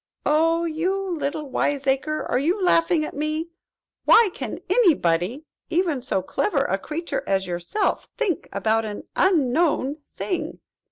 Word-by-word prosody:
"Oh, 330 +3 +3
you 335 +4 0 0.2
little 295 0 -3
wiseacre, 280 +2 0
are 250 - +1
you 340 +9 +1
laughing 330 -2 +3
at - - -7
me? 310 +3 -2 0.6
Why, 455 -2 +7
what - - -19
can - - -5
any 390 -11 +5
body, 180 - -1 0.2
even 330 -6 +1
so 195 -7 -1
clever 415 - 0
a - - -1
creature 335 +2 -3
as 190 -1 +1
yourself 175 - -2
think 400 - -1
about 220 +3 +1
an 210 -1 -6
unknown 300 -4 +2 0.2
thing? 365 - -3
305 Hz, 145 wpm, -23 LUFS, 255-340 Hz, 0.6 s, Why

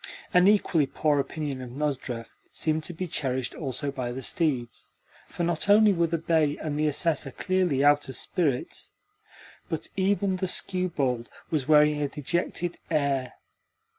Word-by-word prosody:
An 180 +1 +6
equally 185 -8 +3
poor 150 +1 +1
opinion 140 -2 -3
of 125 -1 -8
Nozdrev 135 -5 -3 0.2
seemed 155 0 -1
to 175 - -4
be 185 +3 -4
cherished 130 -6 -2
also 140 -1 -3
by 130 -3 -4
the 130 +2 -6
steeds, 130 -6 -1 0.4
for 175 - -4
not 170 +3 0
only 210 0 +7
were 170 -2 +2
the 165 +1 -1
bay 160 -2 +1
and 150 -1 -3
the 155 - +2
Assessor 150 -1 +2
clearly 175 -4 +1
out 145 -1 +4
of 130 - -5
spirits, 145 -6 -1 0.8
but - - -4
even 195 0 +1
the 185 0 -1
skewbald 145 -11 -1 0.2
was 145 -5 0
wearing 150 -1 +5
a 145 - +1
dejected 170 +4 -2
air. 140 -5 0
150 Hz, 155 wpm, -27 LUFS, 135-175 Hz, 0.8 s, only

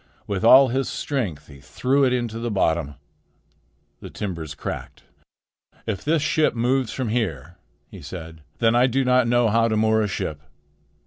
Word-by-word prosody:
With 100 -1 -3
all 130 +3 +7
his 130 +2 -1
strength 110 - -3
he 70 -2 -14
threw 130 - 0
it 130 - +2
into 120 -3 -2
the 120 0 -3
bottom. 80 -8 0 1.0
The - - -9
timbers 85 -7 -6
cracked. - - -7 0.8
"If 105 -5 -4
this 155 0 +1
ship 155 -4 +1
moves 125 +1 0
from 130 -4 -3
here," 90 - -3 0.3
he - - -12
said, 80 +1 -9 0.2
"then 115 -1 +2
I 120 +2 +4
do 135 +1 0
not 125 -1 +3
know 120 -1 +3
how 115 +2 +3
to 110 -1 0
moor 110 0 +2
a 105 - 0
ship. 75 -7 -4
115 Hz, 170 wpm, -23 LUFS, 90-125 Hz, 1.0 s, all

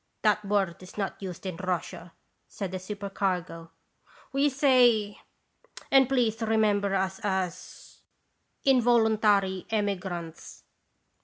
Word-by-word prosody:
"That 210 0 +3
word 195 -4 -1
is 185 +2 -13
not 200 -1 -3
used 185 -1 -7
in 185 -3 -4
Russia," 180 -1 -4 0.3
said 195 -3 -6
the 185 - -4
supercargo. 185 -4 -4 0.6
"We 280 +2 +3
say 250 -7 +3 0.7
and 270 -1 +5
please 235 -4 +1
re 225 0 +1
member 205 -2 +2
us 190 +1 -1
as 190 -4 -4 0.3
' - - -48
involuntary 220 -6 +2
emigrants.' 190 -6 -4
200 Hz, 110 wpm, -27 LUFS, 185-220 Hz, 0.7 s, and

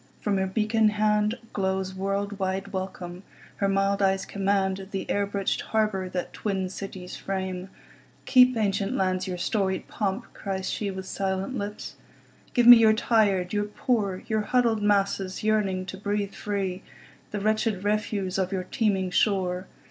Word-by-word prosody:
From 205 -2 0
her 190 0 +1
beacon 215 +2 +2
handGlows 210 -3 0
world 195 +1 -2
wide 190 +1 -2
welcome; 185 -1 -5 0.4
her 200 - +1
mild 195 +1 +1
eyes 195 0 +2
commandThe 195 -1 -1
air 200 0 0
bridged 200 -1 -1
harbour 210 -4 0
that 180 -1 -4
twin 190 -3 -2
cities 190 -1 -7
frame."Keep, 195 +6 0
ancient 200 -2 0
lands, 185 0 0
your 180 -1 -3
storied 190 0 -1
pomp!" 195 -3 -2
cries 190 -1 -3
sheWith 190 -2 -3
silent 190 +5 -2
lips. 205 -2 -5 0.6
"Give 245 - +4
me 245 0 +12
your 220 -1 +6
tired, 205 -5 +2
your 205 0 +1
poor, 210 -3 -1
Your 220 -2 0
huddled 230 0 +2
masses 200 -2 +1
yearning 200 -4 +1
to 190 - -7
breathe 205 0 -2
free, 195 -3 -3 0.5
The 205 - -3
wretched 215 -1 0
refuse 205 -2 -1
of 185 0 0
your 190 -2 -1
teeming 190 -2 0
shore. 185 -2 +1
195 Hz, 140 wpm, -26 LUFS, 190-210 Hz, 0.6 s, me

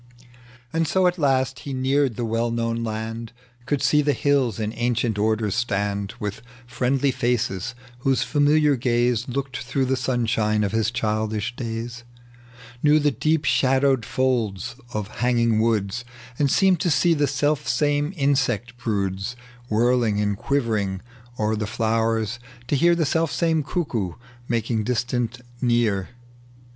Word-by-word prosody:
And 165 0 +1
so 185 +4 +2
at 180 0 +2
last 130 -3 +1
he 140 - -6
neared 135 -1 +1
the 120 - -2
well 115 +1 0
known 115 0 -1
land, 115 +1 -4 0.3
Could 145 0 0
see 150 +2 +4
the 145 0 +2
hills 135 -7 +1
in 110 0 -2
ancient 120 -2 0
order 110 0 +1
stand 100 -2 -1
With 105 +1 -4 0.2
friendly 130 +3 +1
faces 120 -3 -1 0.2
whose 135 +1 +1
faroiiiar 145 -1 +3
gaze 120 -1 +1
Looked 135 0 -3
through 130 +1 -1
the 130 +1 +1
sunshine 115 -4 0
of 100 - 0
his 110 0 +1
childish 110 0 -2
days; 115 0 -5 0.8
Knew 150 0 +5
the 150 -1 +2
deep 155 +2 0
shadowed 135 -1 +3
folds 120 -3 -1 0.2
of 105 -4 -3
hanging 115 -2 +2
woods, 110 0 0 0.4
And 145 -2 +3
seemed 190 +3 +4
to 175 - +1
see 170 +2 +3
the 145 -2 +2
selfsame 145 +1 +1
insect 135 - 0
broods 100 0 -2 0.3
Whirling 115 -1 +2
and 105 -1 +1
quivering 105 -7 -1 0.4
o'er 110 0 +1
the 105 -1 -2
flowers 115 0 0
— 120 0 -22
to - - +2
hear 170 +5 +4
The 165 -2 +1
selfsame 165 +1 +1
cuckoo 135 - -2 0.3
making 115 -1 0
distance 120 0 -1 0.2
near. 120 -6 +1
120 Hz, 140 wpm, -23 LUFS, 110-140 Hz, 0.8 s, Knew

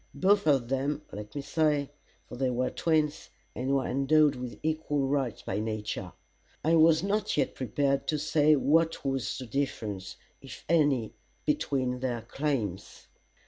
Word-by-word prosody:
Both 200 -1 +3
of 135 -5 +3
them, 140 +3 -1
let 105 +4 -8
me 140 - -3
say, 150 -2 +1 0.4
for - - -9
they 130 +1 0
were 125 +1 -1
twins, 155 -2 0 0.3
and 130 +2 0
were 135 -2 +1
endowed 145 +3 +3
with 125 -1 -6
equal 155 -3 0
rights 135 -4 -1
by - - -2
nature. 110 -4 -4 0.5
I 160 - +3
was 160 0 +5
not 205 -1 0
yet 145 - +1
prepared 135 +3 -1
to 155 - +1
say 150 0 +3
what 160 +3 +2
was 135 -5 -1
the 130 - -6
difference, 110 -6 -3 0.3
if - - -11
any, 145 -8 +2 0.3
between 135 -4 0
their 120 -3 -2
claims. 120 - -3
140 Hz, 150 wpm, -29 LUFS, 125-155 Hz, 0.5 s, was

